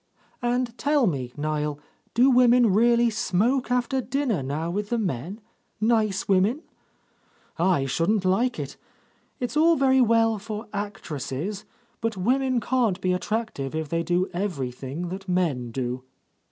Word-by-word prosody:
"And 245 -1 0
tell 290 -2 +3
me, 135 - -2
Niel, 150 0 -2 0.4
do 255 +3 +5
women 245 -3 +5
really 235 +2 +4
smoke 220 +6 +1
after 250 +1 +1
dinner 255 - -1
now 150 +6 -3
with 205 +3 -3
the 240 - 0
men, 180 - -3 0.4
nice 215 -3 +1
women? 200 - +2 1.0
I 170 -6 +2
shouldn't 175 +9 +1
like 230 +7 +2
it. - - -6 0.6
It's 245 +3 -3
all 330 +2 +5
very 265 -2 +4
well 225 -2 +3
for 215 +1 -6
actresses, 195 -3 -4 0.4
but 225 -2 -2
women 255 +5 +1
can't 230 -4 +1
be 185 -1 +1
attractive 180 - -3
if 160 -2 -3
they 165 +1 0
do 175 +3 +1
every 175 -9 -2
thing 140 +8 -6
that 190 +1 -7
men 160 -10 0
do." 125 +1 -3
205 Hz, 140 wpm, -25 LUFS, 165-240 Hz, 1.0 s, do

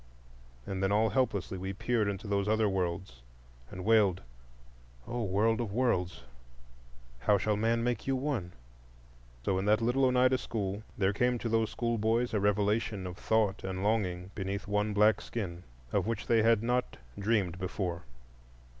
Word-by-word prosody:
And 95 -1 -4
then 95 0 +1
all 110 +2 +3
helplessly 100 -8 0
we 95 +1 -4
peered 110 +1 0
into 100 +1 -4
those 100 0 0
Other 110 0 +3
worlds, 90 -8 -2 0.5
and 90 0 -7
wailed, 105 -5 +4 0.8
"O 120 - -3
World 110 +4 +2
of 110 -4 -3
Worlds, 90 - 0 1.0
how 100 +11 +3
shall 105 +2 0
man 115 +2 +1
make 120 -1 -1
you 135 - +2
one?" 130 -10 -2 0.9
So 95 -1 +1
in 95 - -2
that 105 +1 +4
little 125 +4 +2
Oneida 130 0 +3
school 100 -2 -3 0.2
there 100 0 +2
came 125 +4 +1
to 115 - -3
those 115 -1 +1
schoolboys 115 0 0
a 105 - +2
revelation 105 0 +1
of 90 -1 -5
thought 105 -1 0
and 95 0 -3
longing 95 -4 0
beneath 100 0 -4
one 105 +1 0
black 105 +1 +4
skin, 90 -7 -5 0.3
of - - +1
which 115 - -2
they 115 -1 +3
had 115 -1 +3
not 125 +1 0 0.2
dreamed 100 -4 0
before. 90 -2 -3
105 Hz, 160 wpm, -31 LUFS, 95-115 Hz, 1.0 s, wailed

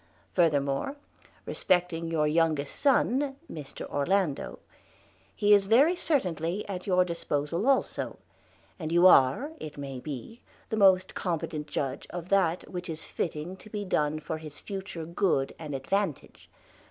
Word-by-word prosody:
Furthermore, 145 - +1 0.5
respecting 175 -2 0
youre 160 -2 +1
youngest 155 -2 +1
sonne, 275 0 +2
Mr 150 -4 -8
Orlando, 155 +1 0 0.8
he 205 0 +4
is 200 -1 +5
very 270 - +5
certainelye 190 - -1
at 185 -2 -5
youre 180 -1 +4
disposal 170 - -2
also, 270 - 0 0.6
and 160 -2 -4
you 175 +2 +5
are, 180 - +6
it 150 -1 -8
may 135 -2 -5
be, 150 - -7 0.3
the 220 - -1
most 190 -3 +4
competent 155 -4 -3
judge 140 -2 -3
of 175 0 -6
that 185 -3 +2
which 180 -1 -6
is 160 -1 -5
fitting 165 +2 -4
to 215 - -14
bee 205 -1 -4
done 155 -4 0
for 155 +1 -5
his 155 -2 -9
future 190 -4 -6
goode 170 -5 0
and 150 -3 -5
advantage. 175 +3 -3
170 Hz, 140 wpm, -28 LUFS, 150-195 Hz, 0.8 s, are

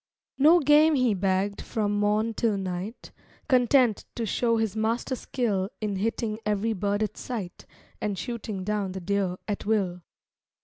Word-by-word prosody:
No 320 +5 +7
game 300 +1 +5
he 255 -5 +3
bagged 195 +1 0
from 210 -2 -1
morn 210 +2 +1
till 220 -2 0
night, 190 +4 -5 0.4
Content 250 -3 +3
to 230 - -2
show 230 +2 +1
his 220 -2 -1
master 230 +4 -1
skill 205 -7 -1
In 210 -3 -2
hitting 220 +1 -2
every 210 +2 0
bird 205 +1 0
at 215 0 -4
sight, 215 -8 -6 0.3
And 205 -2 -2
shooting 215 -1 -4
down 205 -2 -2
the 190 - -4
deer 190 0 -1
at 205 -1 -3
will. 190 -5 0
210 Hz, 150 wpm, -27 LUFS, 195-230 Hz, 0.4 s, No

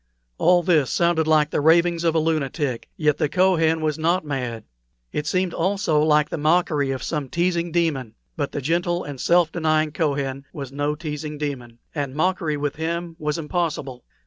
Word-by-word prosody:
All 175 0 +4
this 155 -7 +3
sounded 170 -2 +2
like 155 -1 +3
the - - 0
ravings 170 +2 +4
of 165 -1 +2
a - - +4
lunatic, 150 -5 -1
yet 150 -2 +2
the 150 - +1
Kohen 165 -2 +2
was 155 -1 -1
not 170 +1 +1
mad. 125 -6 -3 0.5
It 150 0 -3
seemed 185 +1 0
also 185 -4 +1
like 150 0 +3
the - - -4
mockery 155 -2 +2
of 135 -1 -3
some 150 -5 -3
teasing 170 +1 0
demon; 145 -9 -1 0.2
but 145 -3 -2
the 145 - -4
gentle 175 +4 0
and 140 -3 -7
self 170 -2 +3
denying 155 -2 +1
Kohen 140 -3 -2
was 140 -5 -6
no 145 +2 -1
teasing 150 -1 -5
demon, 130 -6 -5 0.2
and 140 -3 -3
mockery 165 -2 0
with 145 0 -3
him 170 +1 -3
was 150 0 -1
impossible. 150 -6 -3
155 Hz, 175 wpm, -23 LUFS, 145-170 Hz, 0.5 s, All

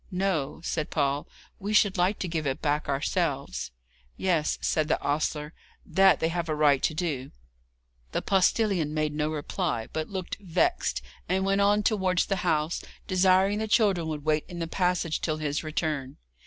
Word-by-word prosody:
'No,' 180 -6 -1
said 155 -3 -2
Paul; 140 -1 0 0.3
'we 205 +2 -3
should 205 -2 +4
like 185 +3 +2
to 185 - -3
give 160 -3 -2
it 135 - -1
back 150 -1 -1
ourselves.' 135 - -1 0.5
'Yes,' 170 -5 +1
said 155 -1 0
the 160 - +1
ostler, 150 +1 -1 0.3
'that 190 +3 +4
they 160 - +1
have 170 -1 -2
a 155 - 0
right 145 -3 +4
to 155 - 0
do.' 150 -6 -2 0.8
The - - -2
postillion 190 -5 +2
made 155 -1 0
no 150 0 0
reply, 155 - -2
but 160 0 -3
looked 190 -3 -4
vexed, 205 - 0 0.3
and 190 +1 +1
went 195 +1 +2
on 205 +1 +3
towards 190 -5 +2
the 195 - -1
house, 160 -2 0 0.2
desiring 190 +2 +3
the 220 - -2
children 200 -7 +3
would 150 -2 -4
wait 155 -1 +2
in 175 -1 -8
the 165 - -2
passage 180 -2 0
till 155 -2 -1
his 150 0 -2
return. 150 -4 -2
165 Hz, 170 wpm, -27 LUFS, 150-190 Hz, 0.8 s, should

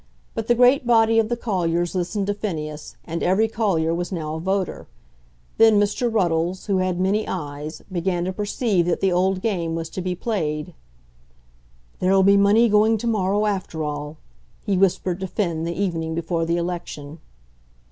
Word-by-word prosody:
But 225 -1 -4
the 240 - +4
great 250 +1 +4
body 225 -1 +4
of 220 -1 +1
the 240 - -1
colliers 175 -6 -1
listened 185 +2 -1
to 205 - 0
Phineas, 155 -7 -5
and 165 0 -4
every 195 +5 +3
collier 190 -8 0
was 175 +2 -3
now 155 -4 -3
a 160 - -4
voter. 190 +2 -2 0.7
Then 220 -2 +6
Mr. 205 +4 0
Ruddles, 175 -3 0
who 195 -2 +1
had 185 -1 -1
many 200 +4 +1
eyes, 150 -2 -5
began 175 -1 -1
to 185 - -2
perceive 205 -2 0
that 175 - +1
the 195 - +2
old 185 +1 +1
game 170 -7 -1
was 165 -1 -4
to 185 - -4
be 180 0 -2
played. 155 -8 -3 1.3
"There'll 190 +1 +3
be 200 +1 +6
money 205 +4 +5
going 215 +1 +4
to 215 - -6
morrow 205 -2 +1
after 190 -6 -2
all," 150 +1 -5 0.5
he 200 -3 +1
whispered 185 -1 +1
to 190 - -3
Finn 170 -4 -2
the 170 +2 -4
evening 165 -5 -1
before 165 0 -1
the 170 +1 0
election. 170 -3 -5
185 Hz, 175 wpm, -22 LUFS, 165-210 Hz, 1.3 s, Then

